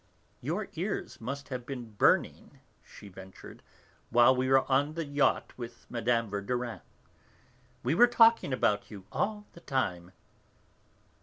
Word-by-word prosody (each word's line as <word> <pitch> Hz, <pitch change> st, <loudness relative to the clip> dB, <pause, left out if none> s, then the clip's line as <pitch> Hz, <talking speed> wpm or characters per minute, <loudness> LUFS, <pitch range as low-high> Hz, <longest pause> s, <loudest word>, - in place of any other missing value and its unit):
"Your -, -, -3 dB
ears -, -, -4 dB
must 140 Hz, +4 st, -6 dB
have 125 Hz, -2 st, -5 dB
been 120 Hz, -3 st, -7 dB
burning," 105 Hz, -, +1 dB, 0.2 s
she 105 Hz, -, -14 dB
ventured, 95 Hz, 0 st, -12 dB, 0.5 s
"while 120 Hz, +2 st, +5 dB
we 130 Hz, +1 st, 0 dB
were 135 Hz, 0 st, +6 dB
on 145 Hz, +3 st, +1 dB
the 165 Hz, -1 st, -3 dB
yacht 145 Hz, 0 st, 0 dB
with 120 Hz, -1 st, -9 dB
Mme. 115 Hz, 0 st, +1 dB
Verdurin. 115 Hz, +4 st, -3 dB, 1.0 s
We -, -, +1 dB
were 240 Hz, +9 st, +6 dB
talking 230 Hz, -, +4 dB
about 105 Hz, -5 st, 0 dB
you 100 Hz, -3 st, -10 dB
all 210 Hz, 0 st, -2 dB
the -, -, -13 dB
time." 90 Hz, -10 st, -2 dB
125 Hz, 135 wpm, -29 LUFS, 110-140 Hz, 1.0 s, were